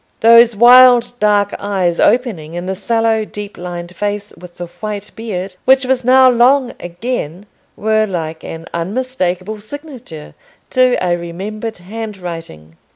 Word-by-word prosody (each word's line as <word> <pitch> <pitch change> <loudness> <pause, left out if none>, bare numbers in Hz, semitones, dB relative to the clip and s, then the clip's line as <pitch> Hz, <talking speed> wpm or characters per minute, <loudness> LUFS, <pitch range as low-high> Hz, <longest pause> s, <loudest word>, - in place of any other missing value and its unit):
Those 230 0 +6
wild 245 +1 +6
dark 205 -1 +2
eyes 190 -4 -1
opening 195 -11 0
in 175 +1 -5
the 190 - -2
sallow 225 +3 0
deep 210 -1 -8
lined 175 0 -7
face, 205 +1 -4
with 175 0 -14
the 175 - -5
white 205 +3 -7
beard, 195 -4 -6
which 265 0 +4
was 255 0 0
now 260 +1 +6
long 250 +1 +3
again, 180 -1 -5 0.3
were 215 0 +1
like 165 -4 -5
an 165 0 -8
unmistakable 190 0 -3
signature 250 - -10 0.4
to 255 -1 +3
a 175 -1 +1
remembered 205 +6 -6
handwriting. 175 - -8
205 Hz, 135 wpm, -16 LUFS, 175-235 Hz, 0.4 s, Those